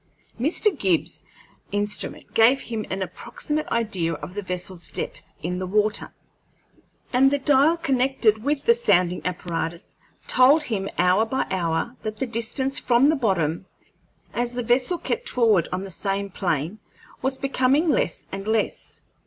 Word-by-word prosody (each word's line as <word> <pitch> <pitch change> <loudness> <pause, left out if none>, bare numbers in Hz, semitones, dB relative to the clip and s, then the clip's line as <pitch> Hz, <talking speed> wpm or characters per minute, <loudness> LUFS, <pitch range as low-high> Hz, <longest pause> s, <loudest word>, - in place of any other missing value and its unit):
Mr. 340 - +2
Gibbs's 185 - 0 0.5
instrument 205 +1 -3
gave 235 +4 +5
him 225 -4 -5
an 190 0 -2
approximate 295 - -4
idea 195 -8 -1
of 170 +3 -7
the 205 - -3
vessel's 180 -1 -3
depth - - -5
in 180 +2 -2
the 185 - -3
water, 210 +2 +1 1.0
and 265 +2 +5
the 285 - +1
dial 285 +4 +4
connected 255 -7 +1
with 285 +1 -1
the 470 - +7
sounding 180 - +2
apparatus 170 0 -4 0.3
told 280 +5 +5
him 205 -8 -2
hour 180 +4 +4
by 245 +4 -1
hour 170 +5 -1
that 215 -1 -5
the 265 - -1
distance 260 +4 -1
from 250 +3 +4
the 315 - +3
bottom, 185 - 0 0.7
as 240 0 -1
the 245 0 -3
vessel 250 +9 +2
kept 475 +7 -3
forward 220 -9 +3
on 185 +1 -2
the 195 - -7
same 195 +2 -2
plane, 175 +1 -2 0.4
was 265 +1 -1
becoming 275 +3 +2
less 290 - +1
and 195 +1 -6
less. 220 -1 -1
220 Hz, 150 wpm, -24 LUFS, 185-265 Hz, 1.0 s, the